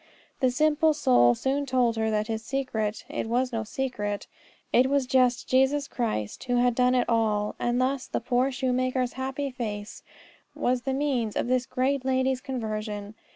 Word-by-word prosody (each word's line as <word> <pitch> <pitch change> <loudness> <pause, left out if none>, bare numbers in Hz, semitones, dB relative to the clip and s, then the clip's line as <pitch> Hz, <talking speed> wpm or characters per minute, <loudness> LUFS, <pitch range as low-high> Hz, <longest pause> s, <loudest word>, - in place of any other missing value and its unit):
The 260 - +3
simple 310 +3 +2
soul 120 - +4
soon 275 - -1
told 250 -3 +2
her 220 0 0
his 220 0 -4
secret; 220 -5 -2
it - - -4
was 250 +2 0
no 225 -1 -1
secret: 210 -4 -3 0.5
it 255 +2 +5
was 280 -1 +2
just 255 -1 +2
Jesus 265 +2 +2
Christ 220 - -3
who 245 -1 0
had 245 0 +3
done 250 +1 +3
it 245 - +2
all. 215 -2 +1
And 240 +1 0
thus 260 +1 -1
her - - 0
poor 250 +2 +1
shoemaker's 255 -1 0
happy 270 +1 -3
face 215 -4 -5 0.5
was 250 0 0
the 265 +1 -2
means 265 -7 -1
of - - 0
this 255 0 +1
great 260 +1 0
lady's 260 0 +1
conversion. 215 -5 -4
250 Hz, 165 wpm, -27 LUFS, 225-265 Hz, 0.5 s, it